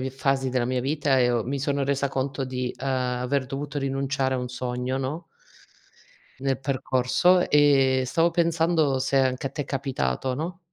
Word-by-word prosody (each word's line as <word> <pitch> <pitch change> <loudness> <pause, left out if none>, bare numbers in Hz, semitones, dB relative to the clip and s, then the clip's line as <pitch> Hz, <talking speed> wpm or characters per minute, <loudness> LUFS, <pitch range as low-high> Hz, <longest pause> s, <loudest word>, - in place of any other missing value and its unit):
vie 130 0 -3
fasi 135 0 0
della 125 -1 0
mia 125 0 -1
vita 140 -1 +1
e 125 -1 +3
ho 120 -3 0
mi 140 +3 -2
sono 140 +1 0
resa 140 0 0
conto 135 0 -2
di, 125 -1 -3
ehm, 135 - -5
aver 130 +1 -1
dovuto 145 +2 -4
rinunciare 135 0 -1
a - - -1
un 125 0 -4
sogno, 125 +1 -3
no 145 +6 -4 1.2
nel 135 -1 0
percorso, 135 +6 +2
e 135 -3 +4
stavo 165 +6 +2
pensando 165 -5 +1
se 135 +1 0
anche 130 0 +1
a - - -16
te 145 - -4
è - - -10
capitato, 130 - -2
no? 165 +5 -4
135 Hz, 180 wpm, -25 LUFS, 130-140 Hz, 1.2 s, e